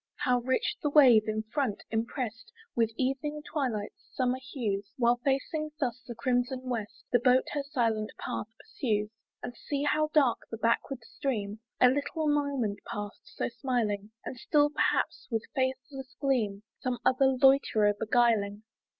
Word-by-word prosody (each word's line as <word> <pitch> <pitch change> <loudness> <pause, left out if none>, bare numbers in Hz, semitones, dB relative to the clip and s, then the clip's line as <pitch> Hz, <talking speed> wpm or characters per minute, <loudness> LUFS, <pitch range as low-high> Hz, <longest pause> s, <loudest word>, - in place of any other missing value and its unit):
How 250 -1 +2
rich 255 +2 0
the 295 - +1
wave, 250 -8 +7
in 215 0 -1
front, 220 -1 -2
imprest 225 0 -3 0.2
With 230 -2 +3
evening 290 +3 -1
twilight's 250 -9 -3
summer 255 0 +1
hues, 210 -7 -3
While, 240 -1 +3
facing 275 +4 -1
thus 250 -3 -1
the 240 - -6
crimson 245 +2 0
west, 235 -5 -5
The 245 - +5
boat 250 +1 +4
her 290 - -1
silent 230 -7 -1
path - - -4
pursues! 215 - -2 0.3
And 245 - -5
see 285 +2 -3
how 305 +1 +2
dark 275 -7 +4
the 225 - -5
backward 230 +3 0
stream! 230 -12 -3 0.2
A 250 - +7
little 285 +4 -1
moment 280 -8 0
past, 205 0 -5
so 205 - -3
smiling! 225 -4 -1 0.2
And 255 - -5
still, 295 +4 +3
perhaps, - - 0
with 225 -3 -1
faithless 260 -1 -3
gleam, 220 -8 0 0.2
Some 255 -1 -2
other 265 +1 +4
loiterer 260 -6 +5
beguiling. 215 -1 +1
250 Hz, 150 wpm, -29 LUFS, 220-275 Hz, 0.3 s, wave